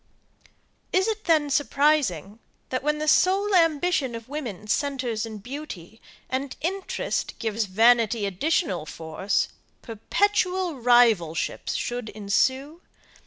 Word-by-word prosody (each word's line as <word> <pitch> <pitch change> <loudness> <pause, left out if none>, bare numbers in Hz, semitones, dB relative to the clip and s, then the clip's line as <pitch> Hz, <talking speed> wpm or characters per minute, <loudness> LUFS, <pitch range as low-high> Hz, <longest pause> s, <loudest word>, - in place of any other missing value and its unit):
Is 375 +2 +2
it 435 -1 -3
then 310 -4 +2
surprising, 275 - +1 0.3
that 255 - -2
when 300 +1 0
the 305 0 -3
sole 390 +5 +3
ambition 325 -6 +2
of 230 -1 -8
woman 245 -9 -6
centres 245 -2 -1
in 220 -1 -7
beauty, 220 - -9 0.3
and 265 +1 -4
interest 380 +4 -3
gives 220 0 -1
vanity 225 +2 +3
additional 190 - -1
force, 165 +5 -2 0.3
perpetual 365 - 0
rivalships 225 -10 +2
should 240 -2 -3
ensue? 260 - -1
255 Hz, 110 wpm, -25 LUFS, 215-310 Hz, 0.3 s, sole